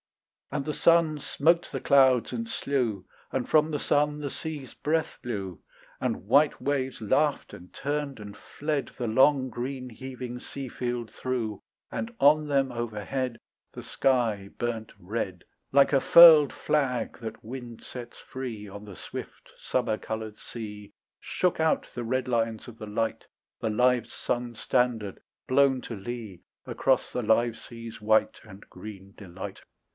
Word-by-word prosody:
And 145 -2 -1
the 150 - -2
sun 165 -2 +4
smote 170 +4 +2
the 135 - -3
clouds 130 -3 +4
and 230 0 -3
slew, 120 - -1 0.3
And 130 -2 -1
from 155 0 +4
the 145 - -1
sun 150 +1 +1
the 145 -2 -4
sea's 150 -5 -6
breath 160 +1 -1
blew, 100 -7 -5 0.4
And - - -2
white 145 +7 +4
waves 135 -3 -1
laughed 140 +7 +1
and 90 0 -12
turned 145 -2 -3
and 105 -1 -9
fled 150 -3 -3
The 120 - -2
long 130 +3 +4
green 125 +2 -5
heaving 125 +1 -7
sea 135 +1 -7
field 120 -2 -3
through, 115 -5 -3 0.3
And 230 +1 -4
on 150 +2 +5
them 135 -2 +2
overhead 120 +2 -3 0.4
The - - -8
sky 115 -7 +1
burnt 115 -2 -3
red 95 -2 -4 0.3
Like 140 +1 +5
a 135 - +5
furled 160 -4 +9
flag 135 -5 -1
that 110 -2 -7
wind 120 -1 -8
sets 120 -2 -9
free, 120 -6 -6
On 100 +1 -9
the 100 -3 -10
swift - - -9
summer 120 -4 0
coloured 110 -1 -5
sea 105 -3 -8 0.3
Shook 180 -3 0
out 160 0 +2
the 120 - -4
red 130 +3 -1
lines 115 -2 0
of 115 -2 -11
the 110 - -7
light, 110 +2 -2 0.4
The 110 - 0
live 125 +1 +2
sun's 120 -2 -3
standard, 120 -6 0 0.3
blown 135 0 +4
to 115 - -6
lee 105 -3 -7 0.2
Across 135 -1 +1
the 125 - -1
live 115 +1 +3
sea's 115 -2 -10
white 110 +1 +3
And 100 -2 -13
green 100 0 -10
delight. 95 0 -8
125 Hz, 150 wpm, -28 LUFS, 110-140 Hz, 0.4 s, furled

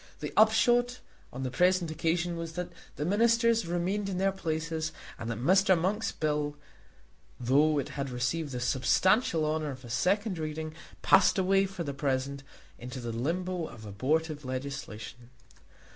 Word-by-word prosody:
The - - -5
upshot 240 +3 +4 0.3
on 130 +2 -5
the 130 - -2
present 180 +2 +2
occasion 165 +2 0
was 165 -1 -5
that 180 +1 -4 0.2
the 150 - -3
Ministers 230 +2 +3
remained 185 +4 -1
in 185 - -3
their 195 +1 +2
places 160 -3 -3 0.3
and 115 - -4
that 115 - -3
Mr. 185 - +4
Monk's 200 +6 0
bill, 150 -1 -1 0.8
though 145 +5 +3
it 140 - -2
had 140 -1 -4
received 130 +5 -2
the 125 - -3
substantial 160 - +2
honour 155 0 -1
of 130 -2 -8
a 120 - -8
second 185 - +1
reading, 155 0 -4 0.3
passed 190 +1 +5
away 195 +1 +3
for 190 -3 -5
the 140 -3 -4
present 135 0 -1 0.4
into 125 +2 -7
the 120 -1 -4
limbo 170 +8 -2
of 110 -2 -11
abortive 150 +9 -1
legislation. 130 -3 -6
160 Hz, 155 wpm, -29 LUFS, 135-185 Hz, 0.8 s, passed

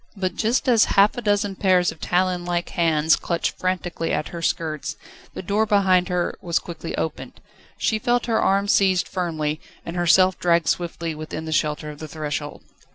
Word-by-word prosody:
But 185 -1 -2
just 230 +5 0
as 235 -3 +5
half 200 +2 +5
a 245 - -4
dozen 205 -2 0
pairs 185 -2 +3
of - - -15
talon 180 0 0
like 175 0 -2
hands 160 -2 +3
clutched 170 -1 -2
frantically 180 -2 -2
at 150 - -1
her 170 - -7
skirts, 155 -3 -2 0.4
the - - -5
door 210 +4 +1
behind 190 -3 +3
her 180 -1 0
was 170 -1 0
quickly 170 -1 -6
opened. 160 - -4 0.4
She 220 - 0
felt 245 0 +1
her 225 -2 +1
arm 200 +1 +2
seized 190 -3 +3
firmly, 155 -4 -2 0.2
and 170 - -6
herself 180 +1 +4
dragged 170 -3 +2
swiftly 170 -1 -2
within 155 +1 -6
the 160 - -5
shelter 150 -1 -1
of 145 - -12
the 155 - -7
threshold. 150 -1 -5
175 Hz, 180 wpm, -23 LUFS, 160-195 Hz, 0.4 s, as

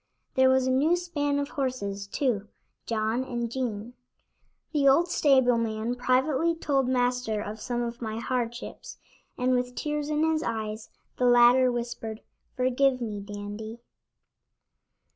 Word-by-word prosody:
There 260 0 +5
was 260 0 +3
a 260 - +1
new 295 +7 +3
span 295 -5 -1
of 285 0 -2
horses, 200 -8 -3
too; 215 -3 -1 0.4
John 225 +2 0
and 240 -3 -3
Jean. 240 -3 -3 0.8
The 285 -3 +2
old 330 +6 +5
stable 260 -5 +4
man 225 +1 -2
privately 265 +6 +1
told 275 -5 0
Master 245 -3 0
of 210 +1 -6
some 240 -1 -2
of 235 +1 -5
my 220 -1 -4
hardships, 240 0 -4 0.4
and 255 0 +1
with 250 0 -1
tears 300 -1 -2
in 305 0 +1
his 320 -1 +2
eyes, 220 -2 -4 0.3
the 250 - +1
latter 245 +1 +6
whispered: 235 -2 -5 0.3
"Forgive 255 +1 +2
me, 215 -4 -4
Dandy." 205 +2 -7
245 Hz, 140 wpm, -27 LUFS, 225-270 Hz, 0.8 s, latter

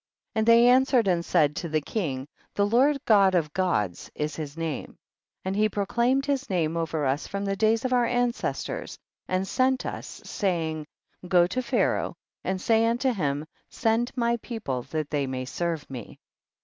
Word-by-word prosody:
47. - - 0
And 220 - +1
they 235 +1 +7
answered 255 -2 +4
and 175 -2 +2
said 150 -4 +2
to 170 - -3
the 155 0 +1
king, 145 -6 -3 0.3
the 200 - +3
Lord 260 +7 +4
God 195 -4 +5
of 155 -4 0
Gods 105 - -1
is 150 +1 -2
his 150 -1 -6
name, 165 -3 -4 0.5
and 190 +1 -1
he 215 +1 +3
proclaimed 240 +7 +1
his 280 -1 -1
name 170 -4 0
over 160 -2 -1
us 135 +3 0
from 200 0 -3
the 195 0 0
days 220 +4 +2
of 255 - +1
our 245 -1 +4
ancestors, 245 - -2 0.3
and 185 +1 0
sent 260 +2 +1
us, - - -6
saying, 160 -5 -1 0.4
go 175 -1 +5
to 255 +8 -2
Pharaoh 235 - 0 0.3
and 190 0 -1
say 225 +3 +3
unto 245 +3 +1
him, 145 -6 -1 0.2
send 230 +2 +1
my 235 -1 +1
people 215 - -4
that 155 -2 -3
they 145 -2 0
may 130 -1 -3
serve 165 +2 -3
me. 125 -5 -8
190 Hz, 175 wpm, -26 LUFS, 155-235 Hz, 0.5 s, they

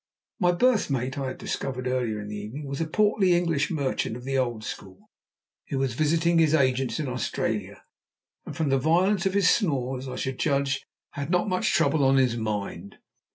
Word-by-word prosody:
My 175 -3 +4
berth 225 +3 +2
mate 130 +1 -2
I 135 - -2
had 130 - -5
discovered 130 -2 -4
earlier 125 -4 -1
in 105 0 -7
the 105 - -5
evening 110 +9 -6
was 140 +2 -4
a 165 - -1
portly 200 0 +3
English 165 -3 0
merchant 140 -7 -1
of 125 - -11
the 135 +1 -2
old 120 -4 -1
school, 95 -3 -9 0.6
who 140 - -3
was 135 -3 0
visiting 165 +4 +2
his 160 -1 +4
agents 130 -1 +1
in 150 - -2
Australia; 125 -1 -3 0.6
and, - - -8
from 155 -3 0
the 135 0 +3
violence 180 +6 +2
of 190 - -2
his 200 -3 +4
snores, 135 - +1
I 130 - -5
should 130 0 -4
judge 140 -2 0 0.3
had 140 0 -5
not 180 +2 +2
much 185 -2 +1
trouble 140 +1 +3
on 135 0 +4
his 130 -3 +3
mind. 105 -3 -4
140 Hz, 195 wpm, -26 LUFS, 125-165 Hz, 0.6 s, My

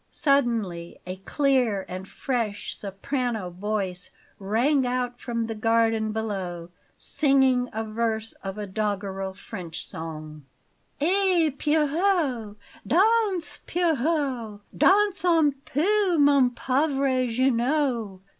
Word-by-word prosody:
Suddenly 230 - 0
a 185 +1 -5
clear 245 -2 +1
and 185 +1 -7
fresh 230 -6 -3
soprano 215 0 -3
voice 185 -1 -3 0.3
rang 240 +8 +2
out 245 0 -2
from 230 -2 -2
the 225 - -4
garden 225 0 +1
below, 190 -6 -4 0.3
singing 265 -4 +2
a 220 +1 -3
verse 220 0 -2
of 195 +1 -5
a 210 - -4
doggerel 195 -1 -3
French 180 -5 -7
song: 155 -2 -7 0.6
"Eh, 355 0 +3
Pierrot! 300 - +1 0.3
Danse, 400 - +2
Pierrot! 280 -10 0
Danse 395 -3 +4
un 325 -4 +4
peu, 375 +4 +2
mon 280 -3 +5
pauvre 265 0 0
Jeannot! 245 -4 0
240 Hz, 100 wpm, -25 LUFS, 205-290 Hz, 0.6 s, mon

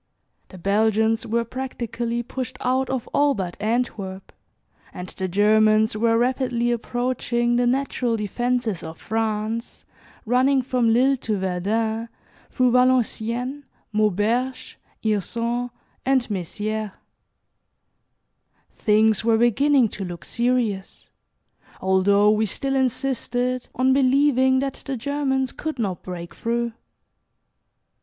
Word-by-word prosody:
The 185 - -11
Belgians 220 +4 +1
were 230 +1 0
practically 240 -1 -4
pushed 255 +1 -5
out 260 +1 0
of 260 -3 -2
all 285 -1 +3
but 180 -4 -4
Antwerp, 210 -4 -2 0.6
and 180 0 -7
the 190 - -4
Germans 215 +3 +3
were 230 +1 +2
rapidly 245 -1 +1
approaching 240 0 -1
the 245 0 +2
natural 250 -2 0
defences 235 -1 -1
of 160 0 -8
France 220 +1 -3 0.4
running 260 +3 +3
from 245 -3 +1
Lille 265 +4 +3
to 220 -4 -2
Verdun, 220 +5 -1 0.4
through 255 -2 +2
Valenciennes, 250 +1 +1 0.3
Mauberge, 215 +5 0 0.2
Hirson 230 +3 -1 0.3
and 260 -2 +2
Mezières. 210 +2 -3 1.8
Things 215 0 +2
were 225 0 +3
beginning 250 +3 +4
to 200 - -6
look 175 -2 -7
serious, 235 -5 -1 0.7
although 200 +2 +4
we 215 0 +1
still 270 +7 -2
insisted 255 -1 -1
on 260 +1 +3
believing 265 -1 +4
that 275 -1 -4
the 270 -2 -2
Germans 265 0 -1
could 315 -2 -5
not 200 -6 -2
break 175 -2 -7
through. 235 0 -2
235 Hz, 110 wpm, -23 LUFS, 215-255 Hz, 1.8 s, beginning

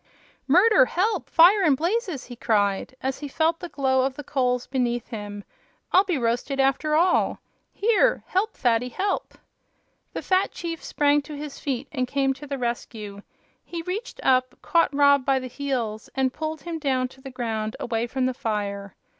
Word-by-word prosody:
"Murder! 430 - +6
Help! 375 - -1
Fire 360 +7 +6
and 300 -7 +4
blazes!" 355 - -1
he 245 - -9
cried, 205 0 0
as 265 0 -2
he 290 - -5
felt 320 +4 +1
the 350 - -7
glow 265 -3 +1
of 265 0 -1
the 295 - -7
coals 250 -3 0
beneath 240 -3 -1
him. 205 -3 -6 0.5
"I'll 375 - +6
be 360 -6 0
roasted, 245 +3 -1
after 275 +3 +2
all! 350 +3 +2 0.3
Here; 465 +3 +2
help, 405 +4 -1
Fatty, 240 0 +1
help!" 390 - -2 0.8
The - - -4
fat 375 +1 +2
chief 335 -1 -6
sprang 290 0 +2
to 295 +1 -9
his 295 -1 -7
feet 275 -1 -3
and 255 -4 -1
came 270 0 +1
to 290 +2 -11
the 280 0 -3
rescue. 225 -4 -4 0.4
He 335 -1 -6
reached 395 +8 -5
up, 255 -1 +2
caught 335 -3 +3
Rob 280 -1 +4
by 270 0 +2
the 260 - -4
heels, 245 -5 -3
and 265 -1 +1
pulled 315 -1 -4
him 335 0 -5
down 260 -4 0
to 265 - -18
the 270 - -8
ground, 225 -4 -3
away 230 0 -1
from 260 +1 -1
the 255 - 0
fire. 200 -4 -3
270 Hz, 180 wpm, -25 LUFS, 245-325 Hz, 0.8 s, Murder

